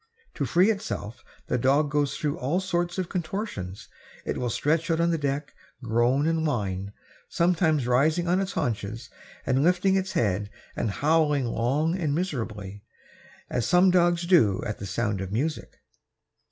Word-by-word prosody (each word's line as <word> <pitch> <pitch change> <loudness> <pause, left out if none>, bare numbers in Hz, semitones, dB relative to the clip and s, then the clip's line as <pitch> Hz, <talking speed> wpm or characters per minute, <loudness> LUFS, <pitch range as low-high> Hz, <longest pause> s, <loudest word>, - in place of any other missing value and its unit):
To - - -2
free 185 +5 +4
itself 130 - -5 0.2
the - - -1
dog 140 +4 +2
goes 145 -2 0
through 150 -3 -2
all 145 +8 0
sorts 175 -2 -1
of 185 -2 -1
contortions. 165 - -4 0.4
It - - -2
will 125 - -2
stretch 155 - 0
out 165 0 +1
on 170 0 +2
the 165 - +1
deck, 140 0 -2 0.3
groan 120 +5 +2
and 165 0 +1
whine, 100 -9 -2 0.4
sometimes 165 -5 +2
rising 155 +8 +2
on 180 +2 +2
its 190 0 -3
haunches 115 0 -3 0.3
and 130 +1 +2
lifting 180 +3 +3
its 190 +1 -1
head 105 - 0 0.3
and 115 - -1
howling 150 +3 +2
long 140 +8 0
and 155 -6 -1
miserably, 110 - -4 0.7
as 120 -3 -1
some 180 +1 +5
dogs 175 -1 +3
do 155 - +4
at 105 - -4
the 100 - -5
sound 100 0 -1
of 95 0 -5
music. 145 +9 -3
150 Hz, 160 wpm, -26 LUFS, 115-175 Hz, 0.7 s, some